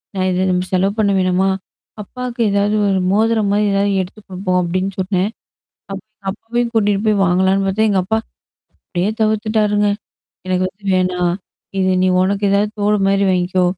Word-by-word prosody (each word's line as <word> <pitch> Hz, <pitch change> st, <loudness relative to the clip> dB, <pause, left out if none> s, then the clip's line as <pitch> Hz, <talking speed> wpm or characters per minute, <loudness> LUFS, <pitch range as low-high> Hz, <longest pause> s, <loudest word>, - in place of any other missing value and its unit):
"நான் 185 Hz, 0 st, 0 dB
இத 185 Hz, +1 st, 0 dB
த -, -, +1 dB, 0.2 s
செலவு 195 Hz, +2 st, +2 dB
பண்ண 200 Hz, -2 st, +3 dB
வேணாமா? 185 Hz, +1 st, +2 dB, 0.5 s
அப்பாக்கு 250 Hz, +2 st, -7 dB
ஏதாவது, 200 Hz, +1 st, +1 dB
ஒரு 190 Hz, -1 st, +1 dB
மோதிரம்மாரி, 210 Hz, -1 st, +2 dB
ஏதாவது 200 Hz, +1 st, +1 dB
எடுத்து 195 Hz, +4 st, -12 dB
குடுப்போம்" 185 Hz, -1 st, -1 dB
அப்பிடின்னு 185 Hz, +3 st, -2 dB
சொன்னேன். 185 Hz, +1 st, 0 dB, 0.6 s
அப் 195 Hz, -, -6 dB, 0.3 s
அப்பவே 230 Hz, +4 st, -3 dB
கூட்டிட்டு 205 Hz, -2 st, +2 dB
போய் 215 Hz, -1 st, +3 dB
வாங்கலான்னு 190 Hz, +2 st, +2 dB
பாத்தேன் 215 Hz, +3 st, +2 dB
எங்க 195 Hz, -2 st, +2 dB
அப்பா. 220 Hz, +4 st, 0 dB, 0.7 s
அப்பிடியே 180 Hz, +3 st, -2 dB
தவிர்த்துட்டாருங்க. 215 Hz, -1 st, +1 dB, 0.6 s
எனக்கு 185 Hz, 0 st, +1 dB
வந்து 200 Hz, +2 st, -30 dB
வேணாம். 180 Hz, -1 st, +1 dB, 0.4 s
இது 185 Hz, 0 st, +2 dB
நீ -, -, +3 dB
உனக்கு 200 Hz, +2 st, 0 dB
ஏதாவது 205 Hz, +1 st, +2 dB
தோடுமாரி 200 Hz, -1 st, +2 dB
வாங்கிக்கோ. 180 Hz, 0 st, +1 dB
195 Hz, 150 wpm, -18 LUFS, 185-210 Hz, 0.7 s, பண்ண